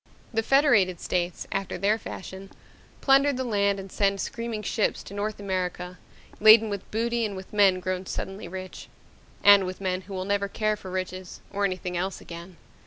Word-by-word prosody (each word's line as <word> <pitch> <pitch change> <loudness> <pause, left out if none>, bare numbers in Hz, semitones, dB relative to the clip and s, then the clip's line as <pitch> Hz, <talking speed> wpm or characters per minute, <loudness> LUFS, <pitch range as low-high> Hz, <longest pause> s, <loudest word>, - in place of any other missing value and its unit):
The 225 - +2
Federated 225 - +3
States, 175 -1 -2
after 195 -1 -2
their 205 +4 +1
fashion, 190 -1 -8 0.5
plunder 275 +1 +5
the 260 -1 -3
land 200 -4 +1
and 195 -1 -9
send 200 -1 +1
screaming 230 -1 -4
ships 215 +1 0
to - - -11
North 205 +1 -3
America 180 -2 -3 0.4
laden 220 0 +7
with 200 -1 -5
booty 235 +2 0
and 205 -3 -2
with 190 +2 -10
men 195 -3 +4
grown 185 0 -3
suddenly 195 -1 -5
rich 185 +1 -8 0.5
and 200 -1 +8
with 185 - -6
men 185 -1 -1
who 195 +1 -9
will 185 0 -3
never 200 0 0
care 215 +1 0
for 190 -2 -10
riches 185 0 -5
or 200 0 +1
anything 185 -2 -3
else 185 +2 -2
again. 170 +1 -10
195 Hz, 175 wpm, -26 LUFS, 185-215 Hz, 0.5 s, and